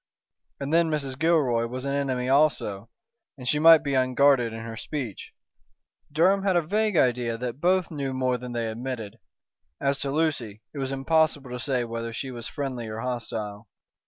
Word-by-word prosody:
And 140 +2 -3
then 165 0 +4
Mrs. 140 -4 -3
Gilroy 140 -8 +2
was 130 +2 -6
an 140 - -1
enemy 130 -3 -1
also, 130 -7 +1 0.5
and 125 -2 -8
she 150 +4 +2
might 160 0 +8
be 140 -2 -1
unguarded 130 -1 +3
in 115 0 -6
her 115 0 -6
speech. 115 -1 -5 0.8
Durham 185 +6 +3
had 190 -2 +1
a 175 - +3
vague 210 +3 0
idea 120 -3 +2
that 125 +3 -5
both 185 0 +2
knew 140 -3 -3
more 130 -1 0
than 125 0 -7
they 120 -1 -1
admitted. 115 -1 -5 0.6
As 140 0 0
to 140 - -2
Lucy, 135 -9 -1
it 145 - -6
was 135 0 -2
impossible 145 -1 +1
to 125 - -4
say 130 -1 0
whether 115 0 -5
she 130 +3 -5
was 120 -2 -6
friendly 130 -6 -4
or 110 +1 -5
hostile. 115 -4 -4
130 Hz, 180 wpm, -26 LUFS, 115-150 Hz, 0.8 s, might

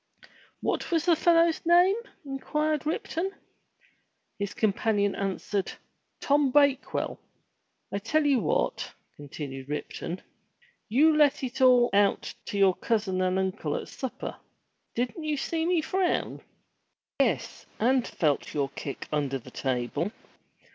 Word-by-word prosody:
"What - - -1
was 330 -2 +1
the 345 -2 +5
fellow's 335 0 +3
name?" 350 +3 +5 0.3
inquired 300 +2 -1
Ripton. 330 +3 -2 1.1
His 200 -1 -3
companion 205 -1 +1
answered, 195 0 -2 0.5
*'Tom 285 -1 +3
Bakewell." 280 -1 +2 0.7
"I 200 - 0
tell 295 +9 +1
you 275 -3 +4
what," - - -1 0.2
continued 140 -2 -7
Ripton, 165 +4 -5 0.7
"you 300 +8 +5
let 290 -2 +4
it 260 +1 -4
all 250 -2 +6
out 200 0 +2
to 205 - -4
your 195 -2 +5
cousin 200 -3 -1
and 185 0 +1
uncle 185 -5 -1
at - - -5
supper. 260 -3 -5 0.6
Didn't 250 +7 -2
you 305 -1 -1
see 325 +4 -1
me 350 -2 +2
frown?" 370 +1 0 0.8
"Yes, - - 0
and 250 +2 +2
felt 150 -2 -1
your 140 -2 0
kick 140 0 -6
under 140 -3 0
the 125 - -13
table. 130 +8 -2
245 Hz, 125 wpm, -28 LUFS, 185-305 Hz, 1.1 s, all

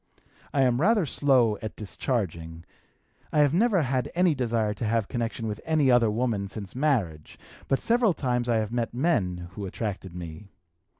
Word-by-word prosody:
I 135 - +2
am 125 0 +2
rather 210 0 +3
slow 125 -7 +2
at 110 - -6
discharging. 85 -7 -4 0.7
I 150 - +3
have 145 -1 +3
never 195 -2 +3
had 130 -1 -1
any 180 -1 +4
desire 115 -5 0
to 120 - -7
have 110 -1 0
connection 115 -1 -3
with 105 -1 -5
any 155 -5 +2
other 120 -2 +4
woman 110 -3 -1
since 100 -1 -8
marriage, 110 - -1 0.3
but 135 - +1
several 230 -4 +2
times 125 -2 -1
I 115 - +3
have 110 -1 -1
met 120 -1 -2
men 95 - 0
who 100 0 -6
attracted 95 -3 -5
me. 85 +3 -8
120 Hz, 170 wpm, -26 LUFS, 100-135 Hz, 0.7 s, any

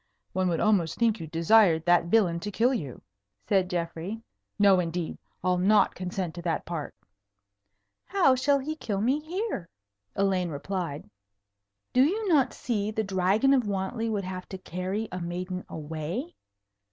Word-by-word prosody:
"One 185 -1 +1
would 165 - 0
almost 195 -7 +2
think 225 -3 +2
you 165 - -6
desired 165 0 +4
that 175 -1 +4
villain 175 -3 +2
to 205 - -4
kill 235 +6 +2
you," 145 - -5 0.4
said 190 -3 +2
Geoffrey. 175 +4 -3 0.4
"No, 200 -2 +5
indeed. 170 -1 -3 0.2
I'll 180 -1 +2
not 210 +4 +4
consent 180 -2 -4
to 175 - -7
that 170 -1 -2
part." 165 -4 -5 1.1
"How 365 -9 +4
shall 280 +2 +3
he 295 +3 -4
kill 205 -10 -3
me 255 +8 +2
here?" 335 - -4 0.5
Elaine 190 -3 +1
replied. 160 0 -4 0.9
"Do 255 - +5
you 410 +9 0
not 300 -8 +4
see 215 -4 -2
the 220 0 -1
Dragon 195 +7 +2
of 250 -5 +2
Wantley 205 +4 -2
would 205 -3 -2
have 185 -1 -6
to 190 - -6
carry 185 +4 -4
a 180 0 -4
maiden 180 +2 -4
away? 160 - -5
190 Hz, 155 wpm, -27 LUFS, 175-225 Hz, 1.1 s, No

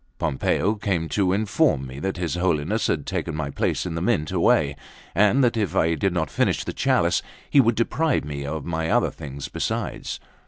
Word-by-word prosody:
Pompeo 90 +9 +1
came 95 -6 -1
to 95 -3 +1
inform 105 - +2
me 65 +1 -8
that 95 +5 -2
his 85 -2 -2
Holiness 90 +3 0
had 75 -4 -1
taken 85 - -3
my 75 -2 -3
place - - -1
in 90 - -3
the 80 - -3
Mint 90 -6 0
away, 70 -1 +3 0.4
and 105 +8 +4
that 120 -1 +3
if 105 -7 -1
I 85 +1 +3
did 95 +5 0
not 85 -2 -1
finish - - +1
the - - -5
chalice, - - +2 0.3
he 140 - +5
would 115 -2 +2
deprive 130 - +1
me 70 -1 -5
of 80 +3 -4
other 80 0 +1
things 70 -1 -7
besides. - - -3
85 Hz, 190 wpm, -24 LUFS, 75-105 Hz, 0.4 s, he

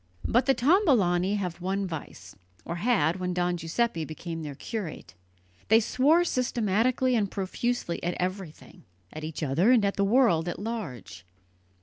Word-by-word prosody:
But 245 +4 +2
the 270 - +4
Tombolani 230 - +3
have 180 -4 -4
one 195 +2 -1
vice 140 - -8 0.3
or 170 - -4
had 175 -6 +1
when 180 -1 -3
Don 175 0 0
Giuseppe 170 +2 -1
became; 165 +1 -6
their 145 -3 -6
curate. 175 - -6 0.5
They 220 +1 +6
swore 285 +9 +3
systematically 250 - +1
and 205 -4 +1
profusely 195 0 -2
at 175 0 -1
everything, 185 -3 -6 0.3
at 155 - -7
each 155 0 -5
other, 155 - +2
and 240 -5 +5
at 200 - -1
the 200 - +2
world 200 -7 +3
at - - -4
large. 140 - -6
190 Hz, 150 wpm, -27 LUFS, 165-235 Hz, 0.5 s, They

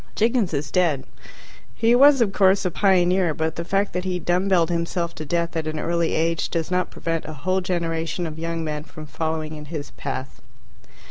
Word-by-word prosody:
Jiggins 225 -3 +2
is 145 -1 -3
dead. 165 -7 +2 0.7
He 230 +1 +3
was, 275 +1 +7
of 205 -4 +2
course, 195 0 +4
a 180 - +1
pioneer, 180 -3 +3
but 160 0 -1
the 170 - -3
fact 195 +3 0
that 180 - -2
he 185 -1 -1
dumb 180 +2 0
belled 175 -3 +3
himself 170 0 -1
to 155 - -7
death 170 +2 -1
at 160 -1 -2
an 155 0 -3
early 170 0 0
age 165 0 0
does 165 +1 -2
not 180 0 +1
prevent 165 -1 -3
a 155 - -6
whole 185 +7 -1
generation 170 -1 -2
of 160 -1 -6
young 165 0 -3
men 150 -1 -3
from 155 0 -10
following 155 0 -3
in 150 -1 -8
his 150 -1 -6
path. 135 -1 -6
170 Hz, 200 wpm, -23 LUFS, 155-185 Hz, 0.7 s, was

